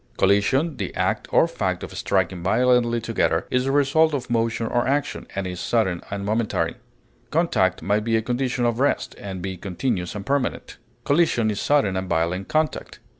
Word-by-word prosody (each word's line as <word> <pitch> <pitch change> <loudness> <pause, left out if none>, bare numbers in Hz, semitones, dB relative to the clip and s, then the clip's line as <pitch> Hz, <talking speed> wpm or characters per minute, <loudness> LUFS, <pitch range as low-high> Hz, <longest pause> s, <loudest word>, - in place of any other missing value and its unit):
Collision, 130 - +2
the - - -4
act - - -1
or - - +5
fact - - -2
of - - -8
striking 95 -2 0
violently 120 +4 +2
together, 115 0 0
is 125 0 +1
the 135 - +1
result 145 +2 +3
of 125 -3 -5
motion 115 0 0
or 120 +1 0
action, 140 +2 -1
and 100 -1 -2
is 90 -1 -5
sudden 95 -7 0
and 100 0 -4
momentary; 110 +1 0 0.6
contact 110 - +1
may 100 +4 +2
be 115 +1 +1
a - - 0
condition 125 +1 -1
of 120 0 0
rest, 140 - +1
and 95 -3 -6
be 95 -1 -3
continuous 95 0 -3
and 100 -1 -6
permanent; 140 -1 -2 0.3
collision 140 -8 +2
is 105 - -3
sudden 140 -10 +2
and 95 0 -3
violent 85 +3 0
contact. 155 0 -1
115 Hz, 175 wpm, -23 LUFS, 95-130 Hz, 0.6 s, or